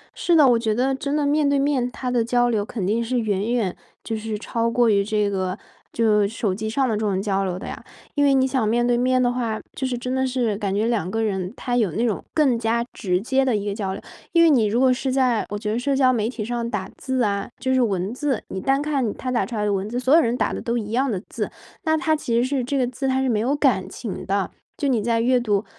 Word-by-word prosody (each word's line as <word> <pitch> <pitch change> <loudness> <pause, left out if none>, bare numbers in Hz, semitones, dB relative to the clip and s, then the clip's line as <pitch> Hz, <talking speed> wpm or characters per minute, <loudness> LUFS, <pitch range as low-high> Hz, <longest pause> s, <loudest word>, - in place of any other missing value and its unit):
是 345 - +2
的， 300 -4 +7
我 240 -2 +4
觉 220 -2 0
得 260 +3 +1
真 280 +2 -2
的 300 -1 +1
面 295 +1 +2
对 280 - +2
面， 275 -3 +1
它 250 0 -4
的 240 -2 +2
交 245 +1 +2
流 215 -3 +1
肯 205 -2 -4
定 220 +5 +1
是 245 +2 0
远 210 0 -1
远 210 -7 0 0.3
就 225 - -3
是 215 0 -4
超 230 +2 -1
过 240 0 +3
于 200 -1 +3
这 210 0 0
个， 190 -1 -2 0.3
就 210 -3 +3
手 210 -2 -2
机 220 +3 -4
上 265 +4 +1
的 225 - 0
这 - - -2
种 205 -3 0
交 195 -1 0
流 180 -2 -2
的 - - -8
呀。 - - -7 0.3
因 290 - +1
为 280 -1 +4
你 260 0 +4
想 260 -4 0
面 240 +2 +2
对 240 0 +3
面 255 +1 +2
的 245 -1 +2
话， 230 -3 -2 0.2
就 265 - -2
是 250 -1 -2
真 250 +1 -3
的 265 0 +1
是 245 -4 0
感 200 -2 -2
觉 210 +2 +1
两 225 -7 0
个 225 +3 -1
人 190 -4 -2
他 245 -2 -2
有 215 -7 +2
那 230 +7 0
种 220 -4 -1
更 275 -7 +2
加 230 +1 0
直 180 -4 0
接 265 +6 +1
的 255 -4 +1
一 205 -1 -2
个 205 - -1
交 200 -2 -3
流。 - - -7 0.3
因 335 -1 +6
为 330 - +6
你 245 -6 +4
如 215 +3 +1
果 260 0 +5
是 260 +1 -2
在， 255 -4 +2
我 205 - -3
觉 210 0 -3
得 225 - 0
社 275 +2 0
交 260 -1 +4
媒 220 -2 0
体 235 -4 -5
上 235 0 -2
打 205 -4 -3
字 260 -1 -1
啊， 200 -2 -1
就 260 - 0
是 260 - +3
文 195 -3 0
字， 265 -3 -1
你 190 - -4
单 270 +4 +2
看 275 -7 0
他 255 - -4
打 245 - +1
出 235 - -6
来 210 -1 -1
的 205 - +1
文 195 +1 -2
字 240 +2 -2
所 260 +2 +2
有 335 - +7
人 240 -2 0
打 - - 0
的 - - -4
都 235 0 -1
一 215 -2 -4
样 265 +4 +1
的 195 - -1
字， - - -4 0.4
那 315 0 +3
它 315 -1 +1
其 245 -6 -2
实 235 - +3
是 270 -1 -1
这 275 +3 -1
个 255 - +2
字 255 +2 -3
它 260 0 +1
是 265 - 0
没 225 -4 +1
有 255 +6 +1
感 255 -10 +1
情 225 -5 -6
的。 195 0 0 0.3
就 285 - -1
你 245 -5 +2
在 230 0 +1
阅 250 +2 +3
读 210 -3 0
235 Hz, 305 characters per minute, -23 LUFS, 210-260 Hz, 0.4 s, 的